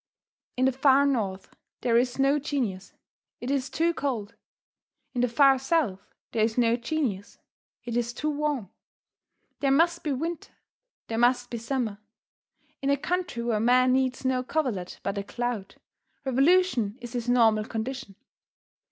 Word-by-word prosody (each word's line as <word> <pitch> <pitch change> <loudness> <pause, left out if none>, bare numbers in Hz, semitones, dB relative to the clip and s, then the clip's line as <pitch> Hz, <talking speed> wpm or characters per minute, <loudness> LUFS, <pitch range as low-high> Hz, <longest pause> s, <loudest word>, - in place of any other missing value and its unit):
In 255 - +3
the 265 - +4
far 270 +1 +4
north 205 -9 -2 0.3
there 240 -2 +2
is 245 +1 +2
no 275 +2 +3
genius 235 -10 -3 0.5
it 245 - -3
is 270 -2 0
too 330 +5 +1
cold. 235 -9 -3 0.8
In 245 - 0
the 250 - +3
far 270 +2 +5
south 265 - 0 0.2
there 220 - +1
is 220 +1 0
no 235 -1 +4
genius 240 -5 -3 0.5
it 240 -1 -4
is 240 -1 0
too 300 +5 -2
warm. 290 -9 -2 0.9
There 275 - +1
must 330 +5 +3
be 300 - -1
winter, 325 +5 -4
and - - -48
there 225 - -3
must 245 0 +2
be 235 - -3
summer. 230 -3 -2 0.8
In 275 - 0
a 280 - +3
country 350 -5 -2
where 230 -3 0
man 255 +3 +4
needs 260 0 0
no 260 -1 +2
coverlet 250 - -2
but 200 +1 -2
a - - -3
cloud, 235 -2 -4 0.5
revolution 270 - +3
is 240 -1 -9
his 245 -1 -3
normal 225 -3 +4
condition. 230 -1 -5
250 Hz, 155 wpm, -27 LUFS, 230-280 Hz, 0.9 s, far